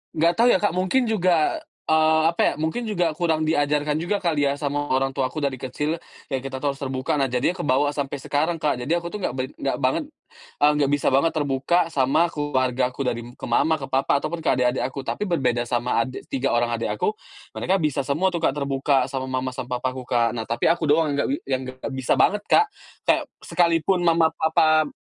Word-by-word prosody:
Nggak 165 +2 +3
tau 235 +5 +3
ya, - - +5
Kak, 170 - 0
mungkin 185 +8 +1
juga, 180 -7 +1 0.2
eee, 160 0 +3
apa - - -1
ya, - - +3
mungkin 160 +10 -2
juga 175 -8 0
kurang 160 -1 0
di 160 - +1
ajarkan 145 0 +1
juga 195 +5 0
kali 165 -6 0
ya 140 - -2
sama 145 0 -2
orang 135 +1 +1
tua 130 -2 -1
aku - - -11
dari 140 -3 0
kecil, 150 +6 -3 0.3
ya 135 - +2
kita 135 -1 -5
tuh 140 +1 -1
harus 140 - -17
terbuka. 130 0 -2
Nah, 135 -2 +1
jadi 125 +8 +1
kebawa 145 -4 +1
sampai 140 -1 -3
sekarang, 155 +5 -1
Kak, 145 -6 -1
jadi 155 +7 0
aku 170 +2 -6
tuh 210 - -5
nggak 180 - -1
bait 130 +2 -3
nggak 135 - -2
banget, 130 - 0 0.6
eee, 150 - +6
nggak 140 - +2
bisa 145 - -2
banget 140 +5 +4
terbuka 140 +3 +1 0.2
sama 140 +5 +3
keluargaku 130 -2 -1
dari 120 -1 -1 0.2
ke - - -7
mama, 160 +7 +2
ke 135 - -6
papa 135 +1 +1
ataupun 165 +3 -4
ke - - 0
adik-adik 125 0 +1
aku. 135 0 -7
Tapi 210 - -2
berbeda 125 -8 +1
sama 120 -1 +1
ade 130 +2 -5
tiga 135 0 -1
orang 120 0 0
adik 115 -1 -2
aku, 210 - 0 0.4
mereka 190 +2 0
bisa 150 -5 0
semua 155 +8 0
tuh, 170 - -2
Kak, 135 - +2
terbuka 135 -1 +1
sama 130 0 -4
mama, 130 0 -2
sama 125 0 -4
papaku, 130 0 -4
Kak. 115 -2 +2
Nah, 115 - -3
tapi 115 +1 -1
aku 165 -2 +2
doang 150 0 +3
yang - - -1
nggak - - -1
bi 275 - +1
yang 130 - -1
nggak 130 +2 -7
bisa 130 -1 0
banget, 210 0 +3
Kak, 430 - +6 0.4
kayak - - +2 0.2
sekalipun 175 +1 +2
mama, 165 -1 +3
papa 155 -1 +3
145 Hz, 220 wpm, -23 LUFS, 130-165 Hz, 0.6 s, eee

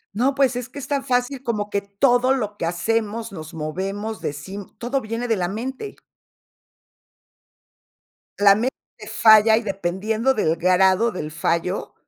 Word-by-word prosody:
No, 255 +6 +2
pues, 270 -2 +2
es 245 0 -5
que 285 - -9
es 260 - -7
tan 280 -2 -1
fácil 255 0 -1
como 210 -4 -2
que 200 -1 -1
todo 245 +6 +2
lo 210 -6 -3
que 200 - -3
hacemos 220 +5 -2
nos 155 -2 -9
movemos, 195 +8 -4
decim 190 +8 -6
todo 255 +3 -2
viene 230 +2 -4
de 225 - +2
la 180 -2 -1
mente. 260 - -6 2.4
La 200 -1 +6
mente 235 +6 -1 0.3
falla 220 0 +6
y 230 - +1
dependiendo 210 +6 -1
del 165 -7 0
grado 190 +5 +3
del 155 -5 -5
fallo 170 +4 -2
215 Hz, 150 wpm, -22 LUFS, 190-245 Hz, 2.4 s, La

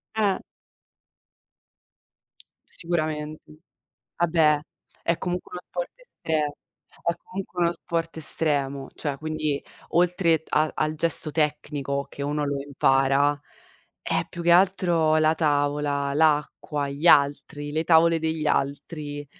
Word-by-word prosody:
Eh. 205 -3 +1 2.3
Sicuramente. 155 -2 -4 0.7
Ah 175 0 +1
beh, 155 -2 +3 0.4
è 170 0 0
comunque 180 0 -5
uno 180 - -6
sport 175 -1 -6
estremo 155 - -3 0.5
è 170 - +1
comunque 185 -2 -5
uno 170 0 +1
sport 165 -1 -4
estremo, 140 -3 +4
cioè 145 -3 -4
quindi 155 -2 -3 0.3
oltre 170 -2 +2
t - - -36
a 155 +1 +1
al 155 0 -1
gesto 155 -1 +6
tecnico 145 -2 -2
che 140 - -9
uno 145 +1 -2
lo 140 -1 -3
impara, 140 +1 +1 0.6
è - - -1
più 170 - -7
che 170 - +3
altro 175 -4 +3
la 155 0 +3
tavola, 145 -2 0
l'acqua, 150 -1 0
gli 145 +5 -1
altri, 145 0 +2
le 160 +2 -1
tavole 165 0 +4
degli 160 -1 -2
altri 145 +1 -3
155 Hz, 120 wpm, -24 LUFS, 145-165 Hz, 2.3 s, gesto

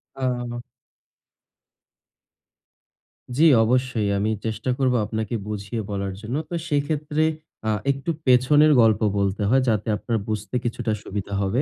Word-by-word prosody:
আ 120 -2 -3 2.8
জি, 160 - +5 0.2
অবশ্যই। 125 -2 +1
আমি 105 +2 0
চেষ্টা 110 +3 -3
করবো 130 -2 +2
আপনাকে 110 +1 -3
বুঝিয়ে 105 +2 -4
বলার 100 -1 -3
জন্য। 115 +5 -4
তো - - -7
সেইক্ষেত্রে 150 +1 0 0.4
আ - - +2 0.2
একটু 135 +4 -5 0.2
পেছনের 145 +5 +5
গল্প 110 -1 +4 0.2
বলতে 100 +1 0
হয় 130 +1 +4
যাতে 105 0 0
আপনার 115 -1 -2
বুঝতে 105 +1 -4
কিছুটা 115 -1 -2
সুবিধা 100 0 -5
হবে। 105 +8 +1
120 Hz, 125 wpm, -23 LUFS, 105-130 Hz, 2.8 s, জি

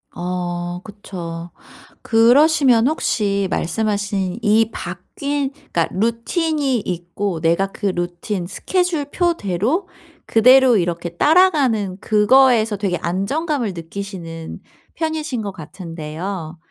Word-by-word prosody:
어 175 0 -3
그쵸. 175 -5 -8 0.5
그러시면 250 +1 +5
혹시 200 -9 0
말씀하신 205 -1 -1
이 220 +1 +3
바뀐 285 -2 -4
그러니까 175 - -2
루틴이 260 - 0
있고 175 0 -3
내가 170 +4 +2
그 205 - -3
루틴 175 +1 -3
스케줄표대로 330 - -1 0.4
그대로 255 +1 +6
이렇게 175 -1 -1
따라가는 275 - +3
그거에서 220 0 +4
되게 190 -3 -1
안정감을 225 - -1
느끼시는 165 -1 -7 0.4
편이신 315 -6 -2
것 205 -2 -4
같은데요. 165 0 -7
205 Hz, 245 characters per minute, -20 LUFS, 175-265 Hz, 0.5 s, 그대로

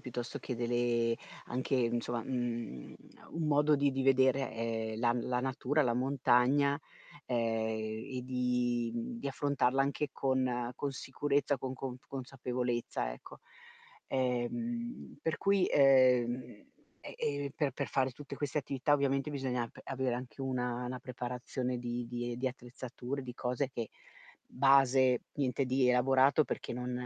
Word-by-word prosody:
piuttosto 120 -2 -5
che 125 - -4
delle 120 -1 +1 0.3
anche 130 +2 -1
insomma, 120 -1 0
mhmm, 120 - -3 0.2
a - - -17
un 165 -1 -2
modo 150 0 +4
di 140 -1 +2
di 135 0 -1
vedere, 130 0 +3
ehm, 110 -1 -2
la 120 0 +3
la 125 0 -1
natura, 135 +3 +1
la 120 -3 +1
montagna, 135 +2 +3 0.5
ehm, 125 - 0 0.8
e - - -1
di 125 -2 0
mhmm, 235 0 -4
di - - -2
affrontarla 135 -1 +1
anche 140 +2 0
con 130 -2 0
con 145 - -2
sicurezza, 140 +1 0
con 130 0 -4
conf 130 -1 -6
consapevolezza, 125 - -2
ecco. - - -12 0.7
Ehm, 230 - -2
per 160 -1 0
cui, 200 -2 +3
ehm 130 -3 +5 0.7
e - - -7
e 145 -1 -1
per 145 -3 +1
per 140 - -2
fare 130 +2 +1
tutte 145 +2 -8
queste 145 0 -3
attività, 140 +1 +1
ovviamente 140 0 +1
bisogna 125 -4 -1
p - - -18
avere 130 -2 -1
anche 125 +2 -7
una 125 -2 -1
una 125 0 -4
preparazione 125 0 -3
di 120 0 -3
di 120 +1 -2
attrezzature, 125 +1 -6
di 125 -1 -7
cose 125 +2 -1
che 115 -4 -5 0.6
base 135 -2 +5
niente 135 -1 0
di 130 0 +3
elaborato 135 +4 +5
perché - - -4
non 125 +1 -3
130 Hz, 140 wpm, -33 LUFS, 120-140 Hz, 0.8 s, ehm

